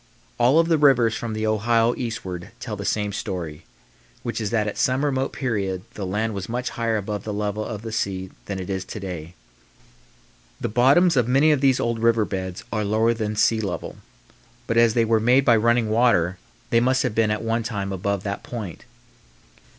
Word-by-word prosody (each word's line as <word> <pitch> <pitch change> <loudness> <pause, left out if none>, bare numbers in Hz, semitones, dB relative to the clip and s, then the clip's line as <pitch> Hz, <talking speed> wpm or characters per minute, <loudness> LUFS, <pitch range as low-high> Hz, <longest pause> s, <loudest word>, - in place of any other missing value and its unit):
All 125 +5 +4
of 165 0 +4
the 165 -2 +2
rivers 125 -6 +4
from 115 -1 -4
the 110 0 -2
Ohio 115 +2 +2
eastward 115 -8 -5
tell 120 -3 -5
the 100 0 -6
same 105 -1 -1
story, 85 -6 -5 0.6
which 115 -1 -3
is 105 - -1
that 110 -1 0
at 105 - -4
some 130 +3 +2
remote 135 -2 0
period 100 -7 -2
the 100 -3 -5
land 110 +4 -1
was 100 0 -5
much 125 +2 -2
higher 115 -1 -1
above 105 0 -4
the 110 - -4
level 105 +1 -2
of 110 -1 -6
the 115 - -5
sea 95 -3 -2 0.2
than 100 - -3
it 95 -1 -5
is 95 -1 -2
to 110 - -7
day. 90 -3 -7 1.2
The - - -2
bottoms 140 - +4
of 125 -3 +2
many 135 +5 +4
of 145 -3 +2
these 135 -2 +3
old 115 -1 -1
river 115 -1 +3
beds 95 -2 -5
are 110 -1 0
lower 110 +3 +2
than 110 -2 -3
sea 110 +1 +3
level, 100 -4 -4 0.7
but 115 - -1
as 115 -1 +4
they 115 -1 +3
were 110 0 +3
made 125 +5 +4
by 120 -4 +6
running 115 +1 +2
water 95 -7 +2 0.3
they 115 - +5
must 130 +2 +2
have 125 - -1
been 110 -1 +2
at 105 +1 -1
one 115 +1 0
time 100 -4 -3
above 100 +1 -2
that 100 -1 -3
point. 110 -8 -7
110 Hz, 205 wpm, -23 LUFS, 100-120 Hz, 1.2 s, by